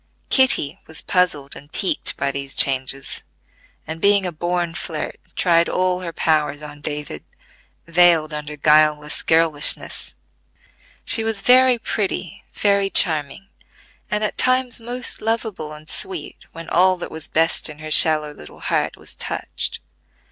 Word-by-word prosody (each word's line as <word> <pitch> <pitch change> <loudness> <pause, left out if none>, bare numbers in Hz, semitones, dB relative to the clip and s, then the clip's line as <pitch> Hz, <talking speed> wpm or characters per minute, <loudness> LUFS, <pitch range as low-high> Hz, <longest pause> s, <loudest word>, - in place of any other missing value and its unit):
Kitty 260 - +2
was 160 - -6
puzzled 155 -7 0
and 145 +2 -14
piqued 195 - -2
by 140 - -1
these 140 0 -5
changes, 135 0 -1 0.6
and 160 +1 -7
being 200 -1 +4
a 180 - -2
born 175 +1 -2
flirt 160 -2 -5 0.2
tried 170 -2 +3
all 185 0 0
her 175 -2 -6
powers 150 -2 0
on 150 -1 -10
David, 145 - -5 0.6
veiled 170 -2 +3
under 150 0 -6
guileless 150 0 +3
girlishness. 160 -3 +1 0.9
She 225 - +5
was 220 -2 -2
very 255 0 +5
pretty, 195 -6 -4
very 200 -1 +1
charming, 160 +1 +1 0.6
and 210 0 -1
at 210 - -2
times 255 -1 +2
most 245 +1 -2
lovable 220 -8 -3
and 155 0 -12
sweet 170 -2 -5
when 165 0 -10
all 185 +1 +3
that 175 - -7
was 160 -1 -5
best 165 0 +1
in 150 - -10
her 155 0 -8
shallow 155 -1 +6
little 75 - -14
heart - - -1
was - - -12
touched. - - -5
165 Hz, 140 wpm, -20 LUFS, 150-195 Hz, 0.9 s, shallow